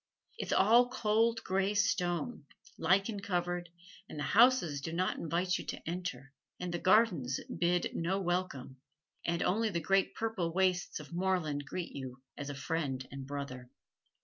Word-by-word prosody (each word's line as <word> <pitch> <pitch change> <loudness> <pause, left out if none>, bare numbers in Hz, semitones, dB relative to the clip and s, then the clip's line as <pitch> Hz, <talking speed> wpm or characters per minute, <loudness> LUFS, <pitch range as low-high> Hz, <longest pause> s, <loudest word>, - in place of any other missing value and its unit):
It - - -3
is - - 0
all 235 +5 +5
cold 225 -1 +1
gray 195 +2 0
stone, 175 -8 0 0.3
lichen 195 +5 +2
covered, 175 -2 -2 0.4
and - - -8
the 150 - -2
houses 200 - +4
do 160 - -4
not 180 +3 0
invite 175 +2 0
you - - -7
to - - -4
enter, 165 -7 -4 0.3
and 180 -1 -4
the 175 - -1
gardens 180 - +3 0.2
bid 175 0 +1
no 180 +4 0
welcome, 175 -8 -2 0.5
and 170 0 +1
only 220 +4 +2
the 170 -4 -1
great 195 +3 +2
purple 220 -7 -1
wastes 185 -3 +1
of 150 +2 -11
moorland 170 -6 0
greet 175 +1 -4
you 130 -1 -6 0.2
as 145 0 -6
a 145 - -4
friend 140 -3 -2
and 135 0 -7
brother. 140 -3 -6
175 Hz, 160 wpm, -33 LUFS, 145-195 Hz, 0.5 s, all